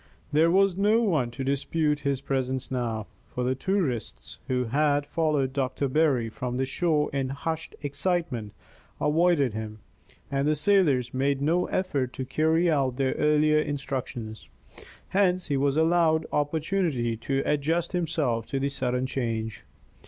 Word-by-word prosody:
There 155 Hz, +3 st, +4 dB
was 195 Hz, +1 st, +3 dB
no 210 Hz, +4 st, +3 dB
one 155 Hz, -, +1 dB
to 125 Hz, +3 st, -6 dB
dispute 150 Hz, +2 st, 0 dB
his 140 Hz, -2 st, -1 dB
presence 130 Hz, -1 st, -2 dB
now, 115 Hz, -4 st, -2 dB, 0.2 s
for 125 Hz, -, -4 dB
the 125 Hz, +1 st, +1 dB
tourists 135 Hz, -, -2 dB
who 125 Hz, -1 st, 0 dB
had 145 Hz, +4 st, +1 dB
followed 145 Hz, -4 st, 0 dB
Doctor 135 Hz, 0 st, -1 dB
Berry 135 Hz, -4 st, +2 dB
from 125 Hz, +2 st, -4 dB
the 130 Hz, -, +1 dB
shore 150 Hz, +1 st, 0 dB
in 135 Hz, -2 st, -1 dB
hushed 160 Hz, +4 st, -4 dB
excitement 145 Hz, -, -2 dB, 0.5 s
avoided 150 Hz, -5 st, +2 dB
him, 110 Hz, 0 st, -5 dB, 0.5 s
and 140 Hz, +1 st, 0 dB
the 155 Hz, -, +3 dB
sailors 150 Hz, -7 st, +2 dB
made 135 Hz, +1 st, +1 dB
no 165 Hz, +5 st, +1 dB
effort 140 Hz, -9 st, -1 dB
to 130 Hz, -, -4 dB
carry 160 Hz, +5 st, +2 dB
out 135 Hz, -6 st, +1 dB
their 135 Hz, 0 st, 0 dB
earlier 150 Hz, 0 st, +3 dB
instructions; 135 Hz, -6 st, -4 dB, 0.6 s
hence 185 Hz, -3 st, +1 dB
he 145 Hz, -, +1 dB
was 140 Hz, +1 st, +1 dB
allowed 160 Hz, -1 st, +3 dB
opportunity 150 Hz, -5 st, 0 dB
to 135 Hz, +4 st, -1 dB
adjust 160 Hz, +4 st, 0 dB
himself 155 Hz, -10 st, -1 dB
to 135 Hz, -, -2 dB
the 140 Hz, +1 st, 0 dB
sudden 125 Hz, -2 st, -1 dB
change. 115 Hz, -4 st, -3 dB
140 Hz, 145 wpm, -27 LUFS, 130-160 Hz, 0.6 s, There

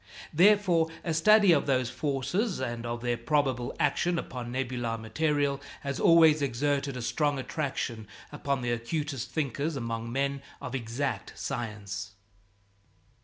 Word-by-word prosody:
Therefore 180 Hz, -1 st, +5 dB, 0.2 s
a 165 Hz, -, -1 dB
study 205 Hz, +4 st, +6 dB
of 150 Hz, -3 st, +3 dB
those 130 Hz, -3 st, +1 dB
forces 160 Hz, -, -1 dB
and 120 Hz, -2 st, -3 dB
of 120 Hz, 0 st, -3 dB
their 120 Hz, -1 st, 0 dB
probable 130 Hz, -1 st, 0 dB
action 170 Hz, +4 st, +1 dB
upon 125 Hz, -6 st, -5 dB
nebular 125 Hz, -3 st, -2 dB
material 140 Hz, +4 st, 0 dB, 0.2 s
has 140 Hz, -1 st, -3 dB
always 160 Hz, -2 st, +6 dB
exerted 140 Hz, +1 st, 0 dB
a 125 Hz, -, -4 dB
strong 145 Hz, +3 st, +1 dB
attraction 130 Hz, -5 st, -3 dB, 0.2 s
upon 140 Hz, -2 st, -2 dB
the 120 Hz, -, 0 dB
acutest 130 Hz, +2 st, -3 dB
thinkers 145 Hz, +1 st, -2 dB
among 115 Hz, -2 st, -3 dB
men 140 Hz, +1 st, -1 dB, 0.2 s
of 125 Hz, -, -6 dB
exact 125 Hz, +2 st, -3 dB
science. 100 Hz, -6 st, -5 dB
135 Hz, 130 wpm, -29 LUFS, 120-150 Hz, 0.2 s, study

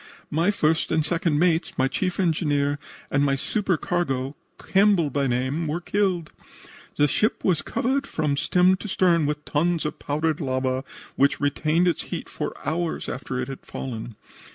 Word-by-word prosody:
My 165 Hz, +6 st, +2 dB
first 160 Hz, -5 st, +1 dB
and 160 Hz, -2 st, +2 dB
second 165 Hz, -2 st, +1 dB
mates, 170 Hz, +1 st, +1 dB
my 130 Hz, -, +3 dB
chief 180 Hz, +8 st, -2 dB
engineer 145 Hz, -5 st, +1 dB, 0.3 s
and 140 Hz, -, +3 dB
my 140 Hz, -1 st, +2 dB
supercargo, 160 Hz, -, -1 dB, 0.2 s
Campbell 195 Hz, -6 st, +3 dB
by 140 Hz, +1 st, +1 dB
name, 130 Hz, +6 st, -1 dB
were 155 Hz, +3 st, -1 dB
killed. 180 Hz, -3 st, 0 dB, 0.7 s
The 145 Hz, -, +5 dB
ship 210 Hz, +9 st, 0 dB
was 180 Hz, -5 st, +2 dB
covered 275 Hz, +3 st, -1 dB
from 150 Hz, -, 0 dB
stem 180 Hz, +5 st, +3 dB
to 210 Hz, -, -7 dB
stern 170 Hz, -5 st, +3 dB
with 150 Hz, 0 st, -3 dB
tons 165 Hz, +2 st, +1 dB
of 150 Hz, -, -3 dB
powdered 155 Hz, +2 st, -1 dB
lava, 130 Hz, -1 st, -1 dB, 0.3 s
which 140 Hz, +1 st, +3 dB
retained 155 Hz, +4 st, +2 dB
its 170 Hz, -, +1 dB
heat -, -, -5 dB
for -, -, -3 dB
hours 165 Hz, +1 st, -1 dB
after 125 Hz, 0 st, -4 dB
it 125 Hz, -, -2 dB
had 135 Hz, -1 st, -8 dB
fallen. 115 Hz, -3 st, -6 dB
155 Hz, 160 wpm, -24 LUFS, 140-175 Hz, 0.7 s, The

